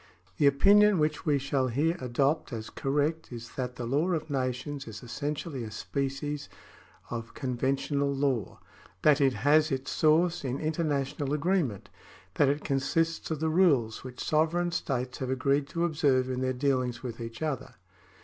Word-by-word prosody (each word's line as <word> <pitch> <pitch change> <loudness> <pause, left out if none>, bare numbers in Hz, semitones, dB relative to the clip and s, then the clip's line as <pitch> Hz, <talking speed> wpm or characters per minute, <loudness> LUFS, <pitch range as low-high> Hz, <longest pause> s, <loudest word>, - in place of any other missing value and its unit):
The 145 - +4
opinion 200 +8 +6
which 155 0 0
we 145 -2 +4
shall 135 -1 0
here 150 +8 +1
adopt 135 +4 0
as 110 -2 -6
correct 150 +4 -1
is 115 -1 -8
that 125 -1 -4
the 125 - -5
law 150 +9 +1
of 160 -2 -3
nations 130 +1 -2
is 110 +1 -8
essentially 145 +2 -4
a 110 - -6
species 140 +5 -3 0.6
of 115 -1 -5
conven 130 0 0
tional 140 0 -1
law 130 -8 -1 0.2
— 90 - -26
that 150 -1 +5
it 135 -2 +4
has 150 +8 +3
its 135 0 -2
soiu'ce 165 +2 +3
in 130 -1 -2
international 145 -3 -1
agree 180 +6 +2
ment— 110 - -5 0.4
that 145 - +3
it 145 +2 -1
consists 160 +4 0
of 160 -2 -3
the 160 - +1
rules 145 -10 +3
which 125 -1 -7
sovereign 165 +3 +1
states 130 -6 -2
have 130 - -3
agreed 140 +2 +1
to 170 +3 -1
observe 140 -6 +2
in 130 0 -2
their 130 0 +1
dealings 130 -2 0
with 120 -2 -6
each 115 +3 -6
other. 150 -6 -3
140 Hz, 170 wpm, -29 LUFS, 130-155 Hz, 0.6 s, opinion